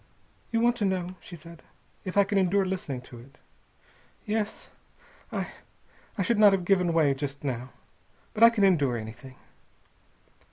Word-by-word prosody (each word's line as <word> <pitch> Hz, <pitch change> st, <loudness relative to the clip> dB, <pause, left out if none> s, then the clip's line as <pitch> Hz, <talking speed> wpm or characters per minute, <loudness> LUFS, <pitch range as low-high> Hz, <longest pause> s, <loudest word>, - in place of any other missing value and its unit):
"You 230 Hz, -1 st, 0 dB
want 240 Hz, +1 st, +3 dB
to 210 Hz, -, 0 dB
know," 185 Hz, -2 st, -1 dB
she 175 Hz, -, -11 dB
said, 170 Hz, +1 st, -13 dB, 0.4 s
"if 185 Hz, +1 st, -4 dB
I 200 Hz, -, +7 dB
can 200 Hz, 0 st, 0 dB
endure 190 Hz, +1 st, +2 dB
listening 180 Hz, -9 st, -4 dB
to 125 Hz, -1 st, -13 dB
it. 135 Hz, +4 st, -17 dB, 0.9 s
Yes. 215 Hz, -1 st, -3 dB, 0.6 s
I -, -, -3 dB, 0.7 s
I 195 Hz, -, +1 dB
should 225 Hz, +3 st, +1 dB
not 205 Hz, -2 st, +7 dB
have 185 Hz, -2 st, 0 dB
given 180 Hz, -2 st, +3 dB
way 155 Hz, -4 st, +3 dB
just 140 Hz, 0 st, -6 dB
now. 130 Hz, -2 st, -3 dB, 0.6 s
But 215 Hz, -, -5 dB
I 230 Hz, -, +10 dB
can 225 Hz, -3 st, 0 dB
endure 145 Hz, -10 st, +3 dB
anything." 120 Hz, +4 st, -9 dB
180 Hz, 160 wpm, -27 LUFS, 140-200 Hz, 0.9 s, I